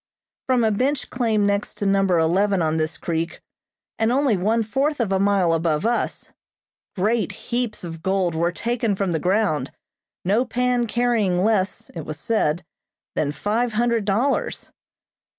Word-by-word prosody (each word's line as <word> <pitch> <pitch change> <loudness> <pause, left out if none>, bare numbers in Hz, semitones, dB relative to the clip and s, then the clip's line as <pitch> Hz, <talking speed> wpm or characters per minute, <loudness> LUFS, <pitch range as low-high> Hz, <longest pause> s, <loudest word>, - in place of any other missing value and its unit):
From 255 -2 +3
a 220 - +3
bench 265 +7 -1
claim 225 -4 +1
next 200 0 0
to 205 - -3
Number 195 -2 +3
Eleven 190 +5 +2
on 160 -1 +1
this 155 0 -1
creek, 165 0 -3 0.6
and 225 +1 +2
only 265 -3 +3
one 220 +5 +1
fourth 270 +7 0
of 225 -5 0
a 190 - +2
mile 195 -4 +3
above 165 +1 0
us, 235 +1 -1 0.6
great 215 +4 +1 0.2
heaps 240 -4 -1
of 165 -2 -7
gold 190 -2 0
were 170 +2 +1
taken 230 +2 -1
from 190 -1 -1
the 160 - 0
ground, 180 -8 +1 0.6
no 210 +7 +3
pan 250 -1 0
carrying 220 -7 +1
less, 200 -3 0
it 165 - -5
was 155 0 -5
said, 175 -7 0 0.5
than 145 - 0
five 220 - -1
hundred 230 -1 +1
dollars. 230 +8 0
205 Hz, 155 wpm, -23 LUFS, 175-235 Hz, 0.6 s, From